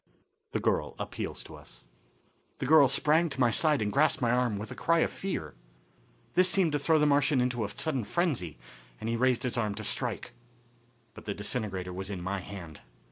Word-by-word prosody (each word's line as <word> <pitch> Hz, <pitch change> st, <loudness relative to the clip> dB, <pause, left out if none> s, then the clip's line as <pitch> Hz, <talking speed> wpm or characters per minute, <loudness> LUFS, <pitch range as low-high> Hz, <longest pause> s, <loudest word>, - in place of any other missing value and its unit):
The -, -, 0 dB
Girl -, -, 0 dB
Appeals -, -, -5 dB
to -, -, -12 dB
Us. -, -, -16 dB, 0.7 s
The -, -, -3 dB
girl 150 Hz, -1 st, +7 dB
sprang 160 Hz, +3 st, +2 dB
to 135 Hz, -, -7 dB
my 120 Hz, -2 st, +4 dB
side 150 Hz, 0 st, +3 dB
and 105 Hz, -, -1 dB
grasped 150 Hz, +2 st, +3 dB
my 120 Hz, -2 st, +1 dB
arm 125 Hz, -4 st, +1 dB
with 105 Hz, +2 st, -7 dB
a -, -, -6 dB
cry 165 Hz, 0 st, +2 dB
of -, -, +1 dB
fear. 80 Hz, -, -4 dB, 0.8 s
This 185 Hz, +1 st, +5 dB
seemed 175 Hz, -2 st, +3 dB
to 145 Hz, -, 0 dB
throw 160 Hz, +3 st, +3 dB
the 150 Hz, -, +3 dB
Martian 145 Hz, -1 st, +3 dB
into 125 Hz, -2 st, 0 dB
a 100 Hz, -, -3 dB
sudden 135 Hz, 0 st, -1 dB
frenzy, 125 Hz, -, -1 dB, 0.4 s
and -, -, -5 dB
he 115 Hz, -, 0 dB
raised 125 Hz, 0 st, +2 dB
his 125 Hz, -1 st, -1 dB
arms 105 Hz, -3 st, -1 dB
to 110 Hz, -, -5 dB
strike. 105 Hz, -, -3 dB, 0.8 s
But -, -, -12 dB
the 100 Hz, -, -3 dB
disintegrator 100 Hz, -4 st, -3 dB
was 95 Hz, +2 st, -6 dB
in 100 Hz, -3 st, -4 dB
my 95 Hz, +3 st, -3 dB
hand. 90 Hz, -5 st, -9 dB
120 Hz, 200 wpm, -29 LUFS, 100-150 Hz, 0.8 s, girl